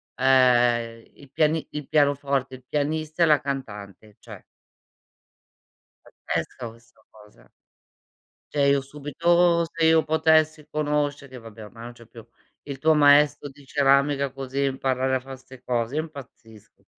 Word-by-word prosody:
ehm, 120 -3 +2
il 140 -2 -18
piani 155 +1 0
il 150 -2 -7
pianoforte, 140 -3 0
il 130 - -16
pianista 155 +2 -3
e - - +6
la 150 -2 +4
cantante, 105 -7 -7
cioè. - - -13 1.9
Pazzesca 120 -2 -3
questa 115 0 -19
cosa. 105 - -20 1.0
Cioè 145 -2 +1
io 140 0 +2
subito 170 +5 +1
se 165 0 -3
io 160 0 +4
potessi 155 -1 +2
conoscere 145 -3 -2
vabbè 115 -2 -12
ormai 115 +2 -12
non 120 - -9
c'è 120 -1 -17
più, 115 0 -14 0.4
il 140 -2 -8
tuo 155 +3 +3
maestro 145 0 +4
di 140 +1 -17
ceramica 140 0 +1
così 135 0 -4
imparare 130 -1 -1
a - - -2
fare 135 +1 -10
'ste 130 -1 -16
cose, 120 +2 -2
io 155 - 0
impazzisco 125 -8 -14
per - - -40
140 Hz, 140 wpm, -24 LUFS, 125-150 Hz, 1.9 s, e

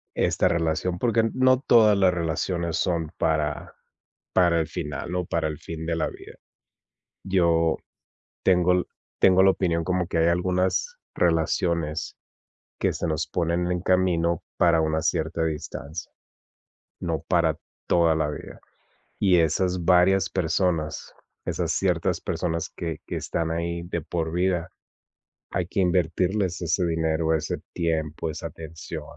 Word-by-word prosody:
esta - - +2
relación, 85 +2 0
porque 115 +3 +2
no 130 0 +4
todas 110 -5 +5
las 95 -2 +4
relaciones 85 0 -1
son 85 -4 -1
para 75 -2 -1 0.6
para 85 -2 +4
el 80 - -1
final, 75 +4 -5
no 90 0 -1
para 80 -1 -1
el 75 - -5
fin 80 -1 -7
de 85 0 -1
la 80 - 0
vida. - - -12 0.9
Yo 85 -4 +2 0.7
tengo 90 -1 +4
l 90 0 +2 0.4
tengo 95 0 +6
la 95 - +7
opinión 85 -3 0
como 90 0 0
que 85 - -1
hay 80 - +4
algunas 90 - 0 0.2
relaciones 80 -1 0 0.6
que - - +2
se - - -3
nos 80 -1 -1
ponen 85 +1 0
en 90 -1 -1
camino 85 -3 +1
para 85 -2 +4
una 80 0 0
cierta 80 +1 0
distancia, 80 0 -5 0.9
no 80 -4 -2
para 85 -3 +2 0.3
toda 85 -2 +4
la 80 -1 0
vida, 75 - -8 0.6
y 95 -3 +4
esas 90 +2 +1
varias 95 +2 +4
personas, 85 -2 -1 0.3
esas - - -1
ciertas - - 0
personas 85 -1 -2
que 85 -3 -5
que - - -4
están 80 -1 -2
ahí 85 +1 -2
de 85 0 -3
por 80 0 -3
vida, 90 -1 0 0.8
hay 90 -2 -1
que 100 - -3
invertirles 90 +1 +1
ese 85 +2 +1
dinero, 80 -1 0
ese 80 -1 -2
tiempo, 80 -1 -2
esa 80 +1 -5
atención, 80 0 -8
85 Hz, 140 wpm, -25 LUFS, 80-90 Hz, 0.9 s, la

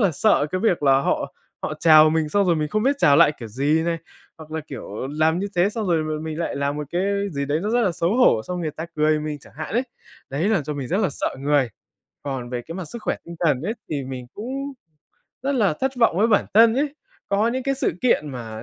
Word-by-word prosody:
là 200 -5 +4
sợ 150 -3 +3
cái 185 - 0
việc 185 -8 +1
là 135 -1 +5
họ 140 0 -1 0.3
họ 155 - -3
chào 155 -1 +7
mình 160 -1 0
xong 200 +5 +2
rồi 170 -2 +3
mình 150 -1 -1
không 215 +6 0
biết 275 +4 +2
chào 140 - +5
lại 160 -2 +6
kiểu 115 - -6
gì 145 +8 +1
này, 170 -1 -1 0.4
hoặc 155 -1 -12
là, 160 - -2
kiểu, 130 -2 -6
làm 160 +2 +3
như 200 - -2
thế 180 +3 +4
xong 215 -2 -3
rồi 160 -3 +2
mà 155 - -3
mình 160 0 -5
lại 170 -4 -2
làm 140 +1 -1
một 150 -1 -4
cái 175 +1 0 0.3
gì 140 -1 -2
đấy 145 +3 0
nó 210 - -1
rất 240 +1 +2
là 185 -6 +1
xấu 170 +7 0
hổ, 180 - +4
xong 180 +5 -4
người 160 -2 -2
ta 160 +3 -6
cười 155 0 +2
mình 150 -1 -4
chẳng - - -17
hạn 155 +3 -6
ấy, 245 - +3 0.5
đấy 155 +9 0
làm 195 -9 +2
cho 150 0 -4
mình 135 -3 -5
rất 190 - +1
là 195 - +2
sợ 135 - -3
người. 140 -3 +2 0.5
Còn 130 -4 -4
về 125 -1 -3
cái 165 - -9
mặt 185 - -5
sức 220 +8 -9
khỏe - - -1
tinh 170 - -9
thần 150 -6 +2
ấy 220 +6 -2 0.2
thì 140 -4 -2
mình 130 -1 -7
cũng 270 +6 -5 0.7
rất 280 - +1
là 210 - +2
thất 265 0 0
vọng 230 -7 +3
với 220 - +4
bản 210 - +3
thân 225 +1 +7
ấy. 285 +1 0 0.4
Có 205 +3 +2
những 255 +2 -2
cái 275 0 +1
sự 265 - 0
kiện 195 -12 +2
mà 115 -3 -7
160 Hz, 265 wpm, -23 LUFS, 145-205 Hz, 0.7 s, chào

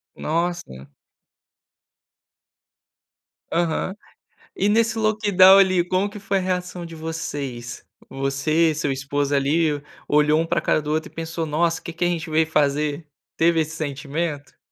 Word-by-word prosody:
Nossa. 160 - -3 2.6
Aham. 170 +3 -1 0.6
E 200 - +1
nesse 225 +1 +2
lockdown, 205 -3 +6
ali, 185 -3 +4
como 185 +3 0
que 210 - -9
foi 195 0 -1
a - - -1
reação 180 -1 -3
de 165 - -10
vocês? 145 -7 -5 0.2
Você, 145 +4 +1
seu 145 -2 -1
esposo, 140 +1 -1
ali, 145 +2 +1 0.3
olhou 150 +1 +3
um 165 - -1
para - - 0
cara - - +1
do 150 - -5
outro 155 +1 -1
e - - -30
pensou: 165 0 -4
"Nossa, 165 +2 0
que 170 - -7
que 175 +1 -2
a - - +3
gente 165 -2 -3
veio 160 +1 +3
fazer?". 150 0 0 0.3
Teve 165 0 +3
esse 160 +1 -3
sentimento? 145 0 -4
160 Hz, 145 wpm, -22 LUFS, 145-175 Hz, 2.6 s, lockdown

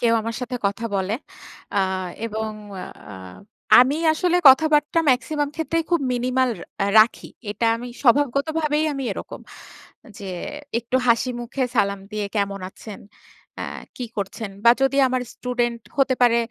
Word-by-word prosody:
কেউ 230 -1 +3
আমার 230 +1 -4
সাথে 250 0 -4
কথা 200 +3 -3
বলে। 195 +1 -1 0.6
আ 200 - +2 0.5
এবং 220 -1 -3 0.6
আ - - -8 0.7
আমি 270 +4 +3 0.2
আসলে 355 +2 +1
কথাবার্তা 300 +3 +4
মেক্সিমাম 290 +4 0
ক্ষেত্রেই 330 +1 -1
খুব 340 -2 +3
মিনিমাল 255 +1 +1 0.3
আ - - 0
রাখি। 220 +2 +3 0.2
এটা 210 +3 -3
আমি 240 +2 -7 0.2
স্বভাবগতভাবেই 290 +4 +2
আমি 275 -1 -4
এরকম - - -8 0.8
যে, 205 - -9 0.5
একটু 235 +2 -1
হাসিমুখে 240 +2 0
সালাম 200 -2 +1
দিয়ে 210 -1 -2
কেমন 200 -1 -1
আছেন? 210 -1 -11 0.6
অ্যা - - -5 0.3
কি 250 - -4
করছেন? 200 +1 -4
বা 235 - +9
যদি 270 +1 +2
আমার 255 0 0
স্টুডেন্ট 240 -1 -2 0.2
হতে 275 -2 +3
পারে 240 -1 +5
245 Hz, 140 wpm, -22 LUFS, 220-280 Hz, 0.8 s, বা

